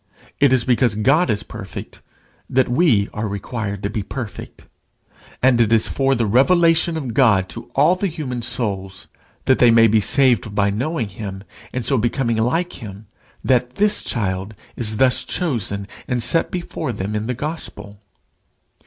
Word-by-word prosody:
It 140 Hz, -2 st, +4 dB
is 130 Hz, -3 st, +3 dB
because 120 Hz, -3 st, +2 dB
God 135 Hz, +11 st, +2 dB
is 105 Hz, -2 st, 0 dB
perfect 110 Hz, -3 st, -9 dB, 0.5 s
that 130 Hz, 0 st, +2 dB
we 120 Hz, -, +3 dB
are 105 Hz, +1 st, -3 dB
required 100 Hz, 0 st, -5 dB
to 100 Hz, -, -1 dB
be 105 Hz, -, -2 dB
perfect. 110 Hz, +2 st, -8 dB, 0.8 s
And 125 Hz, -2 st, +4 dB
it 115 Hz, -1 st, +2 dB
is 115 Hz, -1 st, +3 dB
for 135 Hz, 0 st, +1 dB
the 115 Hz, -2 st, 0 dB
revelation 165 Hz, -, +3 dB
of 130 Hz, -7 st, -4 dB
God 105 Hz, -7 st, +3 dB
to 120 Hz, +1 st, -9 dB
all 150 Hz, +6 st, +4 dB
the 195 Hz, +2 st, -1 dB
human 145 Hz, -8 st, -5 dB
souls, 95 Hz, -5 st, -3 dB, 0.4 s
that 130 Hz, -, +3 dB
they 120 Hz, -, +6 dB
may 115 Hz, 0 st, +6 dB
be 110 Hz, -1 st, +3 dB
saved 115 Hz, -3 st, +2 dB
by 100 Hz, -1 st, +2 dB
knowing 125 Hz, +2 st, -2 dB
him, 95 Hz, -1 st, -7 dB, 0.3 s
and 125 Hz, -2 st, -3 dB
so 130 Hz, 0 st, +2 dB
becoming 115 Hz, 0 st, 0 dB
like 165 Hz, +11 st, -1 dB
him, 105 Hz, -1 st, -9 dB, 0.4 s
that 125 Hz, -1 st, +1 dB
this 210 Hz, 0 st, +2 dB
child 100 Hz, -2 st, -3 dB, 0.2 s
is 110 Hz, -2 st, -2 dB
thus 130 Hz, +1 st, +3 dB
chosen 110 Hz, -, -3 dB, 0.2 s
and 120 Hz, -2 st, 0 dB
set 165 Hz, -, +3 dB
before 170 Hz, -5 st, -4 dB
them 105 Hz, -1 st, -4 dB
in 105 Hz, +1 st, -2 dB
the 125 Hz, -, -2 dB
gospel. 115 Hz, -8 st, -6 dB
120 Hz, 165 wpm, -20 LUFS, 105-135 Hz, 0.8 s, they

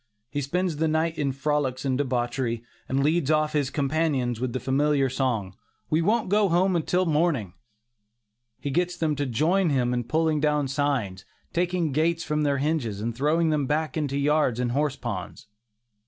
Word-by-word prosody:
He 145 Hz, -, -2 dB
spends 170 Hz, +3 st, -1 dB
the 160 Hz, +1 st, +1 dB
night 160 Hz, +1 st, 0 dB
in 140 Hz, -2 st, +1 dB
frolics 135 Hz, -1 st, -1 dB
and 130 Hz, -1 st, +1 dB
debauchery, 120 Hz, -3 st, -1 dB, 0.3 s
and 135 Hz, +1 st, +1 dB
leads 155 Hz, -1 st, +1 dB
off 155 Hz, -1 st, +2 dB
his 145 Hz, -3 st, +1 dB
companions 140 Hz, -4 st, 0 dB
with 130 Hz, 0 st, -2 dB
the 130 Hz, -, -2 dB
familiar 135 Hz, +2 st, +1 dB
song, 115 Hz, -8 st, -1 dB, 0.4 s
"we 155 Hz, +2 st, +3 dB
won't 215 Hz, +6 st, +1 dB
go 205 Hz, +1 st, +3 dB
home 175 Hz, 0 st, +2 dB
till 180 Hz, +4 st, +1 dB
morning." 150 Hz, -, +1 dB, 1.1 s
He 140 Hz, -, -3 dB
gets 175 Hz, +4 st, 0 dB
them 155 Hz, -3 st, 0 dB
to 145 Hz, -1 st, -2 dB
join 165 Hz, -, +2 dB
him 125 Hz, -3 st, +1 dB
in 120 Hz, -1 st, -1 dB
pulling 155 Hz, +4 st, +1 dB
down 150 Hz, -1 st, +1 dB
signs, 130 Hz, -9 st, -1 dB, 0.3 s
taking 175 Hz, -2 st, 0 dB
gates 165 Hz, +4 st, +1 dB
from 150 Hz, 0 st, -1 dB
their 145 Hz, -2 st, +1 dB
hinges 135 Hz, -8 st, -1 dB
and 115 Hz, +2 st, -2 dB
throwing 155 Hz, +5 st, +2 dB
them 150 Hz, -1 st, +1 dB
into 135 Hz, -, -3 dB
back 155 Hz, +1 st, 0 dB, 0.2 s
yards 140 Hz, -3 st, +1 dB
and 125 Hz, -1 st, 0 dB
horse 140 Hz, +1 st, 0 dB
ponds. 115 Hz, -5 st, -6 dB
145 Hz, 175 wpm, -26 LUFS, 130-160 Hz, 1.1 s, we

